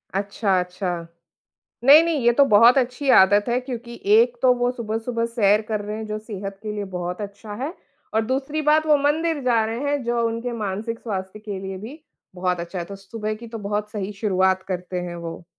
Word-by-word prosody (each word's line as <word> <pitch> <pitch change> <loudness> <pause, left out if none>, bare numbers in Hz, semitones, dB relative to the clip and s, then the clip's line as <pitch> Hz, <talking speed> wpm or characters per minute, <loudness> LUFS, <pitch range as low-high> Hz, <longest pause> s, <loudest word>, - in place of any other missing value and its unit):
अच्छा, 200 -1 0
अच्छा। 180 -2 -4 0.8
नहीं, 290 +4 +9
नहीं 330 -4 0
ये 240 - +6
तो 280 +3 +5
बहुत 230 +5 +7
अच्छी 255 +2 -1
आदत 205 +2 +4
है 240 +1 +2
क्योंकि 240 -2 -7 0.2
एक 240 +2 +4
तो 255 -1 +6
वो 245 0 0
सुबह-सुबह 230 0 -3
सैर 215 -2 +3
कर 215 -2 -1
रहे 210 +1 -5
हैं 220 0 -5
जो 215 0 -3
सेहत 200 -2 -7
के 215 -1 -4
लिए 205 -1 -3
बहुत 180 +2 -4
अच्छा 205 +1 -7
है। 305 +5 -3 0.4
और 220 0 +2
दूसरी 275 +5 -1
बात 310 +1 +3
वो 300 -1 +5
मंदिर 305 +2 +1
जा 230 -3 +3
रहे 225 +1 -3
हैं 290 -1 0
जो 235 0 0
उनके 230 +2 -3
मानसिक 215 +4 -3
स्वास्थ्य 190 -2 -5
के 210 -2 -6
लिए 190 0 -5
भी 260 - -10 0.3
बहुत 180 -1 -1
अच्छा 175 +2 -6
है, 170 - -3
तो 200 +2 -9
सुबह 215 +2 -5
की 235 +2 -10
तो 225 0 -7
बहुत 210 +1 -3
सही 210 -1 -4
शुरुआत 190 -2 +2
करते 180 -1 -3
हैं 175 -1 -5
वो। 170 0 -7
215 Hz, 210 wpm, -23 LUFS, 195-245 Hz, 0.8 s, नहीं